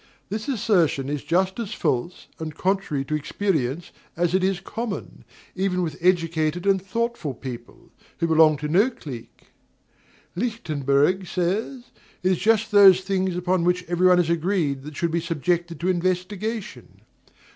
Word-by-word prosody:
This 215 +2 -4
assertion 180 - +1
is 145 -1 -3
just 190 +5 0
as 225 -4 -4
false 130 +9 -2
and 155 -2 -5
contrary 185 -8 -1
to 155 - -4
experience 155 -2 -1 0.3
as 175 0 +1
it 190 0 +2
is 190 -1 +1
common, 215 +2 -6 0.3
even 185 -1 0
with 160 -3 -3
educated 165 -1 +1
and 195 -1 +3
thoughtful 195 - -3
people, 120 -1 -9 0.3
who - - 0
belong 160 -2 +5
to 150 +1 -4
no 195 +11 +4
clique. 135 - -11 0.9
Lichtenburg 175 - 0
says: 210 +9 -2 0.3
"It 185 - +3
is 185 - +1
just 220 +2 +2
those 195 -3 +8
things 190 -1 -1
upon 180 0 0
which 180 +1 +1
everybody 180 +1 +4
is 165 - -5
agreed 165 -5 0
that 150 -1 -9
should 170 -1 0
be 170 +1 0
subjected 170 +1 -1
to 175 - -2
investigation." 185 +4 -3
180 Hz, 145 wpm, -24 LUFS, 160-195 Hz, 0.9 s, those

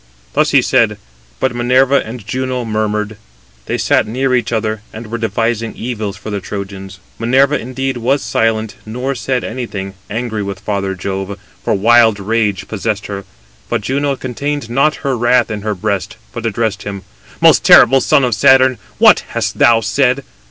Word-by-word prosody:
Thus - - +2
he - - +4
said: - - +2 0.4
but 130 - 0
Minerva 130 +3 +3
and 110 -1 -8
Juno 130 +1 -2
murmured. 105 -1 -2 0.5
They - - -1
sat - - +2
near 130 +4 0
each 125 -1 0
other, 110 -1 -1
and 110 +2 -8
were 115 +2 -5
devising 115 0 -1
evils 110 -5 -4
for 105 +2 -7
the 100 - -2
Trojans. 95 -2 -7 0.2
Minerva, 135 +5 +3
indeed, 130 +1 -3
was 130 +4 0
silent, 110 -1 0
nor 125 +5 -3
said 130 0 -2
anything, 105 -5 -5 0.2
angry 110 0 -3
with 100 -1 -5
father 100 -1 -2
Jove, 95 +1 -4 0.3
for - - +1
wild 110 +1 +4
rage 105 -1 -1
possessed 110 -1 -3
her. 100 -1 -6 0.4
But - - 0
Juno 140 +5 -1
contained 135 0 -4
not 145 +5 +2
her 135 -2 +1
wrath 120 0 +2
in 105 -1 -4
her 105 0 -2
breast, 100 0 -3 0.2
but 115 -1 -3
addressed 110 -2 -1
him: 100 -1 -6 0.4
"Most - - +5
terrible 135 +2 +7
son 140 +2 +3
of 125 -2 +1
Saturn, 130 +2 +4 0.2
what - - +6
hast - - -3
thou 115 -1 +5
said? 130 +5 +1
115 Hz, 165 wpm, -16 LUFS, 105-125 Hz, 0.5 s, terrible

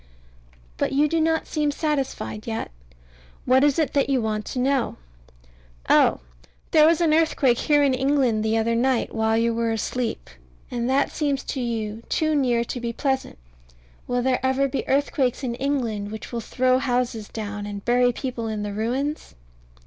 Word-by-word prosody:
But - - -1
you 290 +2 +3
do 330 +2 0
not 320 0 +1
seem 300 -2 -1
satisfied 285 -7 -3
yet? 225 - -3 0.7
What 260 +2 +4
is 290 -2 +3
it 315 -3 0
that 280 -1 +2
you 270 -2 +2
want 215 -2 -2
to - - -5
know? 260 0 +1 0.9
Oh! - - +4 0.5
There 310 -1 +6
was 330 +1 +3
an 320 -2 +3
earthquake 295 -6 +3
here 295 -2 +3
in 275 -2 +3
England 260 -4 +1
the 220 +1 +1
other 225 +1 +1
night, 245 +1 +1
while 220 0 +1
you 230 0 +2
were 230 0 0
asleep; 225 +1 -3 0.4
and 240 0 -2
that 270 +2 +2
seems 280 -3 -1
to 265 - -4
you 225 -2 -3
too 310 -1 +1
near 245 -5 +2
to 245 - -5
be 235 -1 -2
pleasant. 265 +2 -2 0.7
Will 245 0 0
there 260 -1 +1
ever 265 +1 +2
be 270 - -4
earthquakes 270 -2 +1
in 245 -2 -2
England 235 -6 -2
which 220 - -8
will 235 -1 -3
throw 255 +2 +1
houses 245 -4 -1
down, 205 -2 -5
and 200 -1 -7
bury 245 +1 +3
people 245 -2 -4
in 215 -1 -3
the 205 -1 -4
ruins? 255 - -3
250 Hz, 175 wpm, -24 LUFS, 230-280 Hz, 0.9 s, There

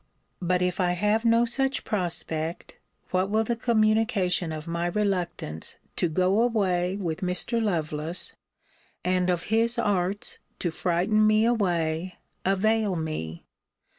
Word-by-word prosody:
But, 180 0 +1
if 180 +1 -1
I 180 -1 +2
have 210 +5 +1
no 230 +1 +5
such 270 +3 0
prospect, 170 -5 -2 0.3
what 185 +1 +1
will 220 +2 +2
the 235 +2 -1
communication 215 -6 +2
of 155 +1 -6
my 170 +1 -1
reluctance 175 - -2 0.2
to 175 - +1
go 185 +6 +2
away 190 -6 +1
with 175 -3 -3
Mr. 185 +6 +1
Lovelace, 160 -4 -1 0.7
and 180 0 +1
of 175 -2 0
his 230 +1 +2
arts 200 -3 -1 0.2
to 175 - -2
frighten 185 +6 +2
me 215 +1 +4
away, 175 -6 0 0.3
avail 205 +1 +2
me? 155 - -4
185 Hz, 130 wpm, -26 LUFS, 175-215 Hz, 0.7 s, no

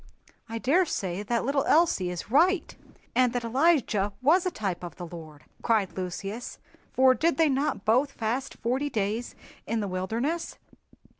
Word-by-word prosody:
"I 230 - -4
daresay 250 - 0
that 235 +3 -1
little 275 +1 +1
Elsie 310 - +3
is 180 +4 -6
right, 350 +7 +3 0.4
and 250 -1 +3
that 245 -1 -2
Elijah 235 - +2
was 335 +8 +3
a - - +2
type 195 - -4
of 175 - -7
the 175 - -7
Lord!" 160 -4 -11 0.2
cried 215 -5 +1
Lucius, 195 +5 -5 0.3
"for 260 0 +5
did 330 +5 +1
they 325 -2 +4
not 275 -5 -1
both 255 +6 +3
fast 235 +4 -3
forty 260 +5 -1
days 220 +1 -2 0.3
in 230 0 -1
the 205 - -2
wilderness?" 225 - -2
235 Hz, 155 wpm, -27 LUFS, 195-285 Hz, 0.4 s, for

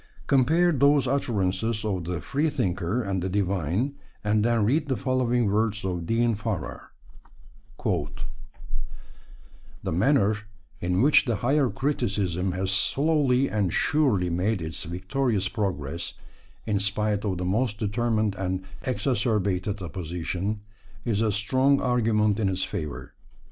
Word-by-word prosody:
Compare 160 +7 +4
those 140 -1 +4
utterances 110 -4 0
of 95 -5 -1
the 90 0 -2
freethinker 110 - 0
and 95 -3 -1
the 95 - -2
divine, 100 - 0 0.3
and 105 0 +2
then 115 -2 +2
read 145 +7 +2
the 130 -3 0
following 125 -2 +1
words 105 0 +1
of 90 -3 -2
Dean 115 +1 +2
Farrar: 105 -4 -4 1.0
The - - -7
manner 105 - +3 0.4
in 90 +4 +1
which 150 +2 +5
the 120 -4 0
Higher 135 +5 +2
Criticism 100 - -1
has 95 +1 -1
slowly 135 +5 +2
and 100 -5 0
surely 110 - +2
made 95 +5 0
its 80 -1 -5
victorious 100 - -1
progress, 85 - -3 0.5
in 105 -3 +1
spite 105 +1 0
of 95 -4 -1
the 90 - -3
most 105 +3 0
determined 110 0 0
and 95 -1 -2 0.2
exacerbated 105 -6 0
opposition, 90 +5 -3 0.4
is 110 -3 +1
a 110 -2 +2
strong 130 +7 +2
argument 110 -4 +2
in 100 -3 +2
its 95 0 -1
favour. 75 -3 -5
105 Hz, 125 wpm, -26 LUFS, 95-125 Hz, 1.0 s, which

